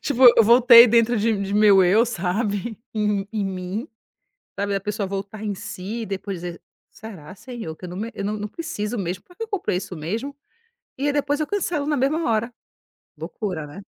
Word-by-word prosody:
tipo 265 -2 -1
eu 230 - +7
voltei 235 +1 +8
dentro 235 +1 +3
de 220 +1 +1
de 200 0 -3
meu 205 -3 +6
eu, 215 +7 +4
sabe, 205 +2 -2 0.2
em 210 -2 0
em 215 -3 -2
mim, 190 +5 -4 0.7
sabe, 200 0 -1
da 195 - -1
pessoa 205 0 -3
voltar 200 +2 -6
em 210 -2 -3
si 200 +5 -6
e - - -4
depois 195 -1 -5
dizer: 175 -1 -7 0.3
"Será 190 -6 -11
senhor, 220 -8 -8
que 180 - -9
eu - - -7
não 180 - -8
me 225 +3 -4
eu 200 - -5
não 210 - -1
não 210 - -4
preciso 240 -7 -4
mesmo, 185 -1 -4
pra 355 - -21
quê 455 - -5
que - - -3
eu - - -27
comprei 190 - -1
isso 180 -1 -6
mesmo?". 220 - -4 0.6
E 275 - -2
aí 290 - +1
depois 290 0 0
eu 305 - 0
cancelo 345 -7 -2
na 295 0 0
mesma 290 +5 0
hora. 230 +1 0 0.7
Loucura, 165 0 -5
né? 195 +7 -11
210 Hz, 210 wpm, -23 LUFS, 195-240 Hz, 0.7 s, voltei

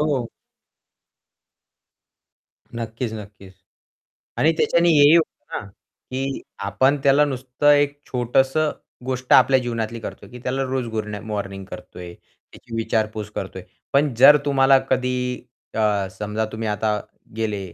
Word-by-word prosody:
हो. 140 -6 0 2.5
नक्कीच, 115 0 -4
नक्कीच. 105 -2 -10 0.9
आणि 160 - +4
त्याच्याने 170 +1 +3
हेही 150 0 +7
होतं 165 - -1
ना, - - -10 0.5
की 135 +1 -3 0.2
आपण 130 +9 +2
त्याला 140 +2 +5
नुसतं 130 +1 0
एक 145 0 +2
छोटंसं 135 +5 +1 0.3
गोष्ट 130 -1 0
आपल्या 130 0 +6
जीवनातली 115 -1 -3
करतोय, - - -9
की 125 - -10
त्याला 135 +1 -1
रोज 130 -1 -2
गुरन 105 -2 -4
मॉर्निंग 100 -2 -4
करतो - - -11
आहे. 85 -1 -8
त्याची 115 - -14
विचारपूस 110 -2 -1
करतो - - -5
आहे. - - -14 0.3
पण 140 -2 +3
जर 145 +4 +9
तुम्हाला 135 -1 +5
कधी 125 -1 +1 0.6
अ, 105 -3 +1
समजा 105 +1 -3
तुम्ही 110 0 -4
आता 105 0 0 0.4
गेले 110 -3 -2
125 Hz, 130 wpm, -22 LUFS, 110-135 Hz, 2.5 s, जर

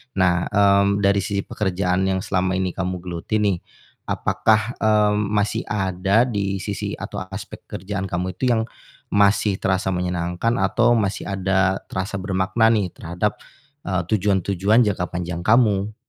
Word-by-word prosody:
Nah, 90 -2 +2
mmm, 100 0 +3
dari 100 0 +4
sisi 100 0 -2
pekerjaan 95 -1 -1
yang 95 0 -1
selama 95 -3 0
ini 95 -1 -1
kamu 90 -1 -4
geluti 85 +3 -4
nih, 95 -4 +1 0.5
apakah, 110 +2 +1
mmm, 105 -1 +2
masih 105 0 -1
ada 95 +2 +1
di 100 -5 -2
sisi - - -3
atau - - -6 0.2
aspek 100 - -9
kerjaan 100 +1 -4
kamu 90 +1 -2
itu 130 - +1
yang 115 -2 +2 0.5
masih 100 -1 +3
terasa 95 0 0
menyenangkan 90 +4 -1
atau 120 +5 +3
masih 105 -3 -1
ada 95 0 0
terasa 95 +2 -3
bermakna 100 +4 +1
nih 105 -5 +1
terhadap, 90 +5 -2 0.5
eee, 90 -1 -1
tujuan-tujuan 100 +2 +2
jangka 95 -3 -1
panjang 85 -1 -4
kamu? 105 -2 +3
95 Hz, 140 wpm, -22 LUFS, 95-105 Hz, 0.5 s, dari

